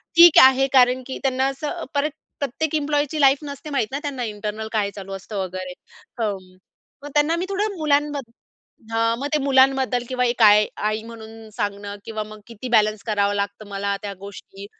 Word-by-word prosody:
"ठीक 340 -1 +9
आहे." 265 +1 +5
कारण 255 0 +4
की 265 - -5
त्यांना 265 0 +1
असं 295 +5 -4
परत 290 +1 0 0.3
प्रत्येक 285 +3 -2
एम्प्लॉयची 295 0 0
लाईफ 275 0 +6
नसते 285 +1 -8
माहीत 275 -7 0
ना 275 - -3
त्यांना 280 -5 -4
इंटरनल 215 0 -5
काय 210 -3 0
चालू 195 -1 -8
असतं 195 +2 -7
वगैरे 185 0 -6 0.5
हं. 195 -4 -4 0.5
मग 290 - -7
त्यांना 300 +3 +3
मी 355 +2 -2
थोडं 405 +1 -1
मुलांबद्दल 290 -4 0 0.6
हां 230 0 +1
मग 280 - -2
ते - - +4
मुलांबद्दल 265 -2 +3
किंवा 250 -1 0
एक 240 0 -1
आई, 210 0 +7
आई 215 +1 -1
म्हणून 225 -1 -11
सांगणं 205 0 -4
किंवा 220 -1 -4
मग 215 0 -12
किती 230 +2 -8
बॅलन्स 215 -2 +2
करावं 205 -1 +1
लागतं 200 +1 -3
मला 200 0 -2
त्या 205 -1 -5
गोष्टी. 200 0 -10
235 Hz, 180 wpm, -22 LUFS, 210-280 Hz, 0.6 s, ठीक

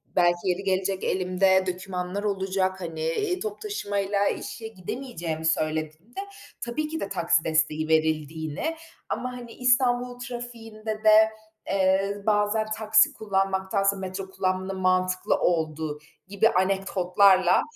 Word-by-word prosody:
belki 175 -1 +4
yeri 180 +2 -1
gelecek, 190 0 0
elimde 190 +1 +2
dökümanlar 185 +1 -3
olacak, 190 -2 -1
hani, 165 -2 -5
eee, 360 - -1
toplu 420 +1 -4
taşımayla 205 - -1
işe 225 - -5
gidemeyeceğimi 180 -6 -5
söylediğimde 155 - -2 0.4
tabii 240 +6 -2
ki 320 +1 -4
de 200 - -4
taksi 170 -3 +2
desteği 155 -1 +1
verildiğini 160 - 0 0.3
ama, 250 - -2
hani, 240 -1 -10
İstanbul 245 -1 +2
trafiğinde 225 -3 -6
de, 220 0 +7 0.4
eee, 195 +1 +2
bazen 210 +1 +2
taksi 220 0 +4
kullanmaktansa 195 -1 0
metro 190 0 -5
kullanmanın 190 0 -2
mantıklı 185 0 +2
olduğu 155 -3 -1 0.3
gibi 200 +3 +3
anekdotlarla, 190 -1 +3
190 Hz, 115 wpm, -26 LUFS, 180-220 Hz, 0.4 s, de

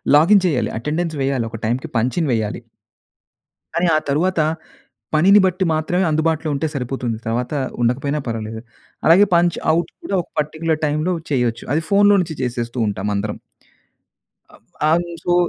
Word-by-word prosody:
Login 185 +6 +5
చేయాలి. 140 -7 0
Attendance 160 +6 -2
వేయాలి. 135 -4 0
ఒక 115 - -7
టైంకి 125 +8 -1
పంచిన్ 130 +8 0
వేయాలి. 110 +1 -2 1.1
కానీ, 170 +1 +2
ఆ - - +5
తరువాత, 170 +5 +1 0.8
పనిని 195 +7 +6
బట్టి 185 +1 0
మాత్రమే 175 +4 0
అందుబాటులో 160 0 0
ఉంటే 140 +3 -1
సరిపోతుంది. 125 -3 -3
తరువాత 120 +4 -2 0.3
ఉండకపోయినా 140 +5 0
పర్వాలేదు. 110 -1 -4 0.4
అలాగే 180 +5 +7
పంచ్ 175 0 +2 0.2
ఔట్ 170 0 -1
కూడా 200 - -2
ఒక - - -17
పర్టిక్యులర్ 155 +1 -1
టైంలో 155 +5 0 0.2
చేయొచ్చు. 120 -3 0
అది 160 - +2
ఫోన్‌లో 205 0 +5
నుంచి 160 -3 -5
చేసేస్తూ 120 -1 -3
ఉంటాం 100 0 -2
అందరం. 105 +1 -3 1.1
ఆ! - - -16 0.4
I'm 170 +2 +2 0.2
so 175 - +1
150 Hz, 145 wpm, -20 LUFS, 120-170 Hz, 1.1 s, అలాగే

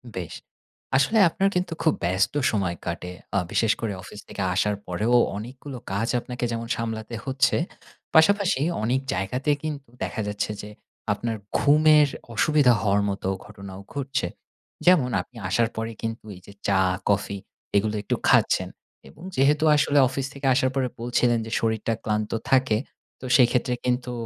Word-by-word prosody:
বেশ! 90 -3 -5 0.6
আসলে 215 +12 +3
আপনার 195 +4 +1
কিন্তু 180 -1 -1
খুব 160 - +4
ব্যস্ত 95 +8 +1 0.2
সময় 95 -5 -1
কাটে। 90 +1 -4 0.2
আ - - +4
বিশেষ 115 -2 +2
করে 110 -3 -2
অফিস 105 - -11
থেকে - - -6
আসার 105 +2 +1
পরেও 105 +7 +1 0.2
অনেকগুলো 130 +4 -8
কাজ 100 +4 -1
আপনাকে 125 0 -4
যেমন 115 0 -3
সামলাতে 115 0 -4
হচ্ছে, 135 0 +2 0.6
পাশাপাশি 195 -1 +4 0.2
অনেক 125 +4 +1
জায়গাতে 125 +10 -1
কিন্তু 145 -5 -5
দেখা 110 - -3
যাচ্ছে 105 +1 -2
যে 105 - -9 0.4
আপনার 115 +2 -3 0.2
ঘুমের 150 0 +5 0.3
অসুবিধা 135 +3 +4
হওয়ার 100 -1 +2
মতো 100 -1 -3 0.2
ঘটনাও 100 -2 -10
ঘটছে। 135 -8 -2 0.6
যেমন 175 -9 +5
আপনি 125 - -16
আসার 115 0 +2
পরে 115 +1 -2
কিন্তু 115 -1 -4
এই 90 - -14
যে 100 - -12
চা, 100 -1 +3 0.3
কফি 100 0 0 0.4
এগুলো 105 +1 +1
একটু - - 0
খাচ্ছেন। - - +3 0.4
এবং 165 - -15
যেহেতু 145 +3 +3
আসলে 145 0 +2
অফিস 130 +1 -3
থেকে 140 0 -7
আসার 130 +1 +2
পরে 130 -2 +1
বলছিলেন 120 0 +2
যে, 110 - -8
"শরীরটা 110 0 0
ক্লান্ত 105 0 -1 0.2
থাকে" 130 -5 +4 0.4
তো - - -9
সেইক্ষেত্রে 125 0 +3
কিন্তু 125 0 0
120 Hz, 155 wpm, -25 LUFS, 105-135 Hz, 0.6 s, ঘুমের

